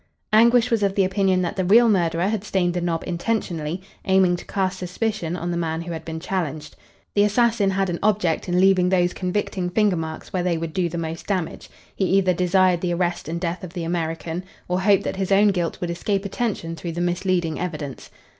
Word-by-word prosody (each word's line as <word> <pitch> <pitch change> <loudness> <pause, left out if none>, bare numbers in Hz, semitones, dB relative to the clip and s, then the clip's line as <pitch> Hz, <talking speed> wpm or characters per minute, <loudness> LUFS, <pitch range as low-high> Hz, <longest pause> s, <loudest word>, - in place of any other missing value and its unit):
Anguish 235 +2 +5
was 230 -2 +2
of 195 -1 +1
the 195 - +3
opinion 190 -1 +2
that 175 +3 -2
the 190 - +1
real 225 +6 +6
murderer 175 -3 +2
had 210 -1 -1
stained 180 -4 0
the 175 - -2
knob 170 -1 -1
intentionally, 175 -3 -2 0.2
aiming 190 -2 +4
to - - -11
cast 190 -1 -1
suspicion 180 -1 -2
on 175 0 -3
the 170 - -2
man 165 -1 -2
who 175 - -6
had 160 -1 -5
been 160 0 -5
challenged. 155 -4 -4 0.4
The 205 - +3
assassin 210 0 +3
had 195 0 0
an 175 -1 -3
object 195 -5 +1
in 175 0 +2
leaving 185 -1 +4
those 180 -1 +2
convicting 185 -1 -2
finger 205 0 +2
marks 160 -1 -6
where 185 - 0
they 175 -2 0
would 165 -1 -4
do 175 -1 0
the 170 - -5
most 165 0 -5
damage. 185 -5 -3 0.3
He 195 - 0
either 185 -2 +3
desired 180 0 +3
the 175 -1 0
arrest 175 -1 -1
and 170 +1 -3
death 175 0 -3
of 180 -2 -8
the 175 -3 -4
American 165 +1 -3 0.2
or 180 +1 0
hoped 200 0 +4
that - - -3
his 190 0 -2
own 205 +2 +5
guilt 175 -4 -1
would 175 -1 -2
escape 195 +3 -1
attention 200 -6 -2
through 165 +2 -5
the 170 - -3
misleading 175 -2 0
evidence. 155 -6 -5
180 Hz, 215 wpm, -23 LUFS, 170-195 Hz, 0.4 s, real